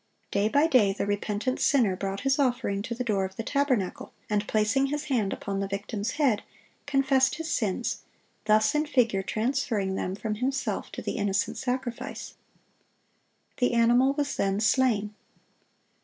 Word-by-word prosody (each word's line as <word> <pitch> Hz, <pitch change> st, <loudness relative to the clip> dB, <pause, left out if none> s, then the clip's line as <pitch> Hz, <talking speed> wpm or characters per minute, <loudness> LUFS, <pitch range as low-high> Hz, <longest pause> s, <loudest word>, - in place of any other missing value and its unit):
Day 200 Hz, +2 st, +1 dB
by 285 Hz, +6 st, +4 dB
day 245 Hz, -11 st, +4 dB
the 200 Hz, -, -2 dB
repentant 205 Hz, +4 st, -1 dB
sinner 230 Hz, -9 st, +3 dB
brought 195 Hz, +1 st, -4 dB
his 270 Hz, +1 st, +1 dB
offering 245 Hz, -7 st, 0 dB
to 235 Hz, +3 st, -4 dB
the 250 Hz, -, -2 dB
door 205 Hz, -5 st, 0 dB
of 190 Hz, 0 st, -5 dB
the 225 Hz, -, -4 dB
tabernacle, 255 Hz, -8 st, -1 dB, 0.2 s
and 210 Hz, 0 st, 0 dB
placing 220 Hz, +6 st, +2 dB
his 295 Hz, +1 st, -2 dB
hand 210 Hz, -6 st, +1 dB
upon 195 Hz, -1 st, -3 dB
the 195 Hz, -, -1 dB
victim's 200 Hz, +2 st, -3 dB
head, 270 Hz, -9 st, +2 dB, 0.5 s
confessed 270 Hz, -1 st, +3 dB
his 325 Hz, +1 st, -5 dB
sins, 215 Hz, +1 st, -1 dB, 0.4 s
thus 215 Hz, +5 st, +4 dB
in 300 Hz, +1 st, +1 dB
figure 230 Hz, -8 st, +2 dB
transferring 220 Hz, -2 st, -1 dB
them 190 Hz, 0 st, -2 dB
from 215 Hz, +1 st, -3 dB
himself 265 Hz, +1 st, -2 dB
to -, -, -6 dB
the -, -, -3 dB
innocent 200 Hz, 0 st, 0 dB
sacrifice. 250 Hz, -2 st, -4 dB, 1.2 s
The 245 Hz, -1 st, +1 dB
animal 240 Hz, +3 st, +4 dB
was 285 Hz, 0 st, -2 dB
then 195 Hz, 0 st, +1 dB
slain. 215 Hz, -1 st, +2 dB
225 Hz, 155 wpm, -27 LUFS, 200-265 Hz, 1.2 s, by